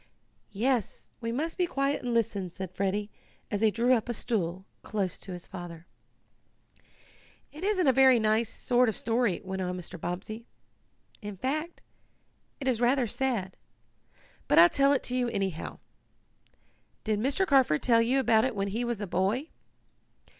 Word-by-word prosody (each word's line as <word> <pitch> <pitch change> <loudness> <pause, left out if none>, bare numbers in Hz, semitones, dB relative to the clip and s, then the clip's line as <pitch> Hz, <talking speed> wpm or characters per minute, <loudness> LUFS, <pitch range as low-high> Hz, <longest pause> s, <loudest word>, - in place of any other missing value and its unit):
"Yes, 240 +1 -1
we 230 -2 -3
must 320 +9 -3
be 360 - +2
quiet 275 -2 0
and 245 - -3
listen," 205 -5 0
said 185 +1 -7
Freddie, 200 +2 -2 0.4
as 205 -1 -1
he 220 - +5
drew 235 +4 +2
up 240 -1 0
a 240 - -1
stool 190 -5 -2 0.2
close 195 -4 -3
to 190 - -8
his 180 -1 -7
father. 175 -2 -9 1.7
"It 310 +5 -10
isn't 390 -3 +1
a 265 - +5
very 260 -1 +6
nice 220 +1 +2
sort 245 0 +2
of 220 - -3
story," 230 -4 0
went 190 0 -4
on 180 0 -2
Mr. 180 -1 -8
Bobbsey. 210 +6 -5 0.7
"In 205 -2 -7
fact 305 - -3 0.8
it 270 - -4
is 245 -3 +1
rather 250 +1 +3
sad. 225 -5 -2 0.9
But - - +3
I'll 170 +1 +9
tell 275 +6 +3
it 280 - +1
to 250 - -2
you, 250 -1 +1
anyhow. 195 -7 -3 1.3
Did 215 -2 0
Mr. 275 - +1
Carford 265 - +3
tell 230 -2 +5
you 250 +4 +2
about 240 -1 +3
when 200 0 -1
he 225 +5 -2
was 235 -3 -2
a - - -2
boy?" 205 - 0
230 Hz, 160 wpm, -29 LUFS, 190-260 Hz, 1.7 s, I'll